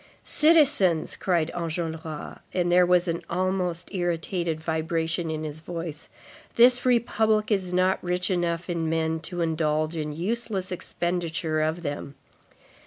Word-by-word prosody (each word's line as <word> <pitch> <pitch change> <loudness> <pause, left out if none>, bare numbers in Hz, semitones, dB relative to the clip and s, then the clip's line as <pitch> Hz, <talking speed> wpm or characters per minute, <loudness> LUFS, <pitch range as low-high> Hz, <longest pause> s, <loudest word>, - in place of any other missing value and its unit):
"Citizens," 280 - +4
cried 170 -4 0
Enjolras, 160 -2 -4 0.2
and 175 -1 +1
there 180 0 +5
was 180 0 +3
an 170 0 -1
almost 180 0 -1
irritated 175 -2 -1
vibration 160 +1 -1
in 155 0 -3
his 155 0 -6
voice, 165 -2 -6 0.5
"this 245 +1 +5
republic 220 -3 +2
is 190 -3 +1
not 185 +1 +2
rich 180 +2 0
enough 170 -1 -1
in 165 -3 -1
men 160 0 0
to 175 +2 -5
indulge 155 -1 0
in 150 -2 -3
useless 195 +3 -2
expenditure 170 -3 -2
of 160 +3 -1
them. 145 -2 -5
170 Hz, 130 wpm, -26 LUFS, 160-185 Hz, 0.5 s, there